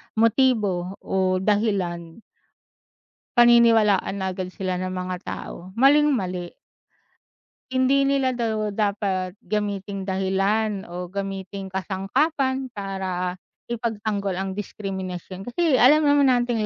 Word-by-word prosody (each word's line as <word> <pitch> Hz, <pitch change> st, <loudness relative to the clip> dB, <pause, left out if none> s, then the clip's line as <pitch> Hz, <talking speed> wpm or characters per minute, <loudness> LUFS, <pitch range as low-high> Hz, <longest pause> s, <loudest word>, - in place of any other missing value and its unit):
motibo 215 Hz, -6 st, +2 dB
o 185 Hz, -1 st, +1 dB
dahilan 190 Hz, -5 st, -1 dB, 1.2 s
paniniwalaan 230 Hz, -5 st, +5 dB
agad 185 Hz, -1 st, -3 dB
sila 185 Hz, 0 st, -3 dB
ng 185 Hz, 0 st, -3 dB
mga 185 Hz, 0 st, -3 dB
tao, -, -, -6 dB, 0.2 s
maling 295 Hz, +3 st, +5 dB
mali. 180 Hz, -8 st, -2 dB, 1.2 s
Hindi 260 Hz, +2 st, +3 dB
nila 275 Hz, -1 st, +2 dB
daw 220 Hz, -3 st, -1 dB
dapat 195 Hz, -3 st, -1 dB
gamiting 200 Hz, -2 st, -3 dB
dahilan 195 Hz, +2 st, 0 dB
o 180 Hz, +1 st, -5 dB
gamiting 195 Hz, 0 st, -5 dB
kasangkapan 260 Hz, -, -1 dB
para 190 Hz, -3 st, -3 dB, 0.3 s
ipagtanggol 215 Hz, -4 st, -2 dB
ang 190 Hz, +1 st, -4 dB
diskriminasyon, 190 Hz, -2 st, -6 dB
kasi 285 Hz, +2 st, +1 dB
alam 295 Hz, +5 st, +6 dB
naman 285 Hz, -3 st, +4 dB
nating 240 Hz, -3 st, 0 dB
200 Hz, 100 wpm, -24 LUFS, 190-240 Hz, 1.2 s, alam